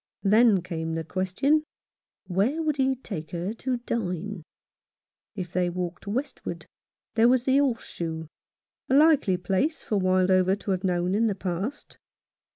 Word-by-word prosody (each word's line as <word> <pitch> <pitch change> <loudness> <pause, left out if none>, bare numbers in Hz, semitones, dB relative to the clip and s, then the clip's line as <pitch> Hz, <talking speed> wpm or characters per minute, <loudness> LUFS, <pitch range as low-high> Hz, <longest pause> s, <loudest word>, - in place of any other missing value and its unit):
Then 210 -2 +5
came 165 -2 -3
the 165 - -2
question, 190 - +1 0.6
Where 205 - 0
would 305 -2 0
he 265 0 +2
take 195 -11 -7
her 180 +4 -3
to 250 +2 -2
dine? 200 -3 -3 0.9
If 180 -4 -5
they 180 -1 +1
walked 180 +1 -5
westward, 250 +8 -4 0.5
there 230 +1 +5
was 250 -1 +3
the 265 0 +4
Horse 270 -5 +1
Shoe, 160 -1 -5 0.6
a 260 - +3
likely 290 - +5
place 195 - -1
for 210 - 0
Wildover 185 0 +3
to 200 - -2
have 185 0 -1
known 180 0 0
in 225 +3 +3
the 205 - 0
past. 190 +9 -5
195 Hz, 150 wpm, -26 LUFS, 180-250 Hz, 0.9 s, Then